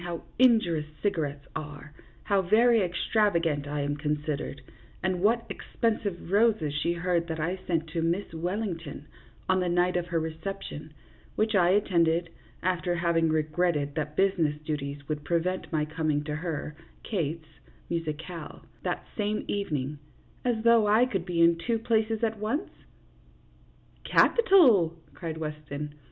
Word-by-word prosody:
how 170 -1 -4 0.2
injurious 220 -12 +4 0.2
cigarettes 145 -8 -1
are, 150 0 -7 0.3
how 200 -2 +2
very 225 +4 +4
extravagant 170 -5 +1
I 145 0 -2
am 145 +1 -1
considered, 150 -2 -3 0.4
and 185 -1 0
what 230 +3 +2
expensive 210 -7 -2
roses 205 -8 +3
she 170 - +1
heard 175 -1 0
that 160 -1 -4
I 175 +4 -1
sent 165 -2 0
to 165 +1 -2
Miss 170 +3 -1
Wellington 170 -4 -4 0.4
on 185 0 +4
the 180 -1 0
night 175 +1 +2
of 175 0 -2
her 170 -1 0
reception, 160 -1 -6 0.4
which 215 0 +1
I 175 -2 +5
attended, 170 -4 +2 0.3
after 180 -1 0
having 170 -1 +2
re 155 0 +3
gretted 155 -2 0
that 150 -1 -3
business 180 -6 +2
duties 145 -2 -3
would 150 -1 -3
prevent 175 +4 -1
my 155 -1 +2
coming 155 -1 -1
to 150 -1 -3
her 155 -2 -4 0.3
(Kate's) 165 -5 -3 0.4
musicale 165 0 -5 0.2
that - - -2
same 210 0 -1
evening 150 -8 -2 0.5
as 235 -3 0
though 230 -2 +6
I 220 +4 +5
could 195 -8 -2
be 175 -2 0
in 170 0 +6
two 230 +6 0
places 225 0 0
at 225 -1 +1
once? 225 - -2 0.5
" - - -31
" - - -31
Capital! 265 - +5
" - - -28
cried 165 -3 -5
Weston. 150 -1 -5
170 Hz, 150 wpm, -28 LUFS, 155-200 Hz, 0.5 s, though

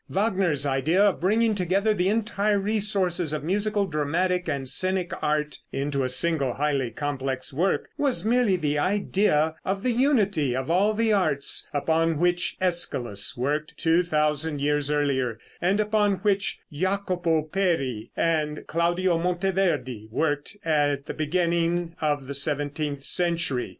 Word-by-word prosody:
Wagner's 190 -8 +1
idea 140 +6 +1
of 205 -3 +2
bringing 220 +4 +2
together 195 +3 +1
the 185 -2 +1
entire 210 -1 +1
resources 195 -5 0
of 150 -2 -3
musical, 205 +4 0
dramatic 175 +3 -1
and 140 -3 -3
scenic 185 +4 +1
art 150 0 -1
into 140 0 -1
a 130 - -1
single 140 -1 +1
highly 140 -3 0
complex 135 +1 -4
work 180 +8 0
was 275 -6 0
merely 235 -3 +3
the 150 -4 -1
idea 185 -4 +1
of 195 +1 -2
the 255 - +2
unity 205 - +2
of 130 +5 -2
all 200 +5 +3
the 225 0 +2
arts, 155 -8 +1
upon 160 +2 +1
which 175 +3 +1
Æschylus 135 - -1
worked 150 +5 -2
two 165 +1 +3
thousand 150 -2 0
years 145 0 0
earlier, 135 -6 0 0.2
and 190 +4 +2
upon 210 -1 +2
which 200 -1 +1
Jacopo 180 -1 0
Peri 155 - -1
and 155 -2 0
Claudio 170 +1 +1
Monteverde 175 - -1
worked 145 - -2
at 145 -3 +1
the - - -5
beginning 170 +1 0
of 145 -3 0
the 140 - -5
seventeenth 145 0 -1
century. 170 -7 0
165 Hz, 140 wpm, -25 LUFS, 145-190 Hz, 0.2 s, merely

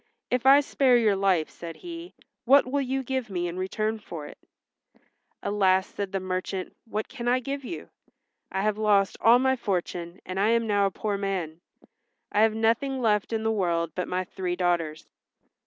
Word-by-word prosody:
"If 250 +1 +1
I 280 +2 +8
spare 265 -3 +3
your 215 -4 +3
life," 190 -5 +2
said 170 -1 -8
he, 340 0 -9 0.3
"what 275 +3 +6
will 280 +3 0
you 265 0 -2
give 260 -2 -3
me 175 -2 -2
in 170 - -5
return 215 +4 -2
for 165 -7 -8
it?" - - -12 1.0
"Alas," 190 -2 +3
said 200 -2 -4
the 195 - -1
merchant, 185 0 -4
"what 215 -1 -3
can 240 -3 -6
I 250 +1 +3
give 275 +2 -4
you? 340 +7 -6 0.6
I 190 +1 -1
have 215 0 0
lost 205 -2 +3
all 230 +2 +7
my 265 +1 +2
fortune 180 -5 -3
and 185 +1 -4
I 205 - +3
am 230 0 +2
now 205 -2 +2
a - - 0
poor 200 +1 -3
man. 180 -5 -3 0.7
I 210 - +3
have 220 0 +4
nothing 230 +5 +1
left 210 -4 +1
in 220 -1 -1
the 220 - +1
world 170 -5 0
but 180 - -3
my 185 0 -1
three 180 -1 -4
daughters." 170 -3 -1
205 Hz, 190 wpm, -26 LUFS, 185-240 Hz, 1.0 s, I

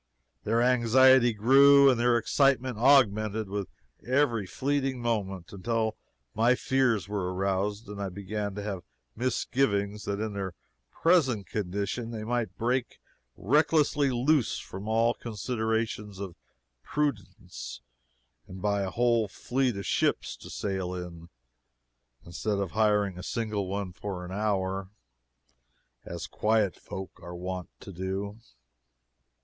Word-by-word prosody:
Their 115 +3 +2
anxiety 125 +1 +5
grew 140 +6 +6
and 130 -3 +4
their 120 0 +4
excitement 130 0 +2
augmented 110 -5 +4
with 100 -1 -4 0.3
every 125 -6 +1
fleeting 135 +2 -1
moment, 100 -7 -2
until 110 +3 -1 0.4
my 120 +3 +4
fears 125 -8 +1
were 100 -3 -2
aroused 100 +3 -1
and 100 0 -7
I 100 - -2
began 100 +2 -4
to 105 - -5
have 100 -3 -4 0.3
misgivings 105 -4 0
that 100 0 -2
in 110 -1 -3
their 95 -3 -4 0.4
present 135 - +2
condition 100 +4 -3
they 110 -2 -5
might 120 0 -2
break 125 +2 -1 0.4
recklessly 145 - +3
loose 130 +2 +2
from 95 +3 -8
all 115 +2 +3
considerations 110 -2 -3
of 95 -3 -6 0.5
prudence 105 - -4 0.7
and 95 - -9
buy 100 0 0
a 95 - -1
whole 115 +1 +2
fleet 125 +3 -1
of 100 - -5
ships - - 0
to - - -12
sail 95 -3 -3
in 85 -2 -8 1.0
instead 100 +4 -2
of 100 -3 -2
hiring 105 -4 +2
a - - -6
single 105 -2 -2
one 100 -1 -3
for 90 -1 -5
an 90 - -8
hour, 95 -2 -1 1.1
as 85 -1 -6
quiet 110 -3 +1
folk 95 0 -8
are 85 +1 -8
wont 90 0 -5
to 100 - -9
do. 95 +4 -4
105 Hz, 130 wpm, -28 LUFS, 95-120 Hz, 1.1 s, grew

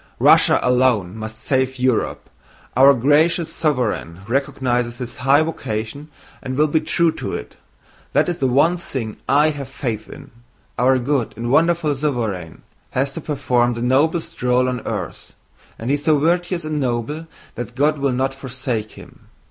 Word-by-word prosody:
Russia - - +5
alone 125 -7 +2
must 110 0 -6
save 130 +2 0
Europe. 125 -2 0 0.5
Our 135 +2 +7
gracious 155 +6 +2
sovereign 120 - -1
recognizes 125 -2 -1
his 120 -1 -7
high 135 +4 +4
vocation 140 -2 -4 0.3
and 130 0 -4
will 150 - +4
be 155 +1 +2
true 165 +1 +1
to - - -5
it. - - -8 0.6
That - - +3
is 175 -1 -2
the 135 - +2
one 145 +8 +3
thing 125 -10 -5
I 150 +3 +4
have 140 -3 -6
faith 115 -6 -4
in! - - -12 0.5
Our 130 +1 +4
good 130 -1 -1
and 120 +1 -3
wonderful 165 0 +3
sovereign 115 - -3 0.3
has 135 +1 -1
to 165 - -6
perform 125 -5 0
the 115 - -4
noblest 150 +7 +1
role 125 +1 +2
on 125 -1 -2
earth, 100 -6 -5 0.4
and 115 +4 -3
he - - +3
is 145 0 -2
so 155 -2 +4
virtuous 175 +2 0
and 155 -1 -2
noble 135 +5 -2 0.3
that 120 0 -7
God 150 +2 +2
will 140 -1 +1
not 130 +2 0
forsake 130 -5 -4
him. - - -15
130 Hz, 165 wpm, -20 LUFS, 120-150 Hz, 0.6 s, Our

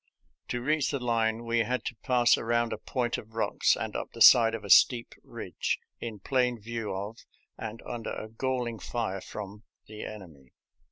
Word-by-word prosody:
To 120 -1 -3
reach 150 +1 +1
the 140 - -1
line 115 -1 0
we 115 0 +1
had 125 +3 -1
to 120 - -3
pass 120 -1 +4
around 115 0 0
a - - -5
point 120 -2 -2
of 110 +1 -14
rocks 115 - +2
and - - -4
up - - -4
the - - -10
side 115 -2 +8
of - - -7
a - - -8
steep 120 -2 +5
ridge, - - -3 0.2
in 115 -2 -5
plain 125 +3 0
view 115 0 -4
of 100 +4 -5 0.4
and 110 +1 -7
under 120 -2 -5
a 110 - -5
galling 120 0 -2
fire 110 -6 -3
from 105 0 -8 0.2
the 110 0 -9
enemy. 80 -11 -10
115 Hz, 180 wpm, -29 LUFS, 110-120 Hz, 0.4 s, side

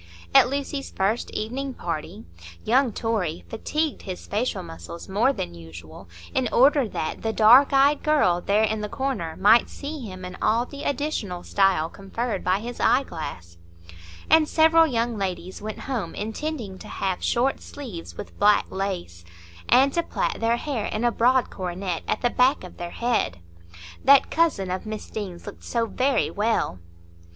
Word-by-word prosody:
At - - +7
Lucy's 280 0 -3
first 205 +5 -1
evening 255 +5 -4
party, 155 - -5 0.4
young 255 +2 +3
Torry 205 -7 -2
fatigued 300 +7 -2
his 185 -2 -7
facial 210 -3 -2
muscles 170 0 -9
more 210 +8 +2
than 85 - -5
usual 85 +1 -12 0.2
in 255 -3 +1
order 275 0 +4
that 155 - -4
"the 225 - -1
dark 235 +7 +6
eyed 275 +1 +4
girl 235 - +2
there 205 +4 +2
in 220 0 0
the 210 - -4
corner" 210 -13 -3
might 215 +4 +5
see 300 +2 -6
him 185 -5 -8
in 180 0 -8
all 230 +3 +2
the 280 +2 -9
additional 240 - -2
style 195 -5 +2
conferred 195 +4 -4
by 185 +2 +1
his 240 +2 -7
eyeglass; 155 - -1 0.7
and 320 -1 +5
several 325 0 +5
young 235 -4 -1
ladies 185 -1 -4
went 215 0 -6
home 255 -6 -4
intending 220 -2 -4
to - - -10
have 190 -2 -3
short 255 +3 +1
sleeves 230 -13 -9
with - - -9
black 205 0 +5
lace, 185 - -4 0.5
and 270 +2 +5
to 340 - +2
plait - - -2
their 230 +1 +2
hair 250 -6 -3
in 215 - -3
a 240 - +3
broad 250 +2 +2
coronet 180 -2 -4
at - - -1
the 245 - +2
back 255 0 +3
of 180 - -11
their 175 0 -5
head,—"That 85 - 0
cousin 295 - +1
of 185 +3 -4
Miss 215 -1 -6
Deane's 190 -5 -6
looked 205 - -10
so 230 -1 -1
very 260 +4 0
well." 210 - 0
215 Hz, 160 wpm, -24 LUFS, 180-260 Hz, 0.7 s, At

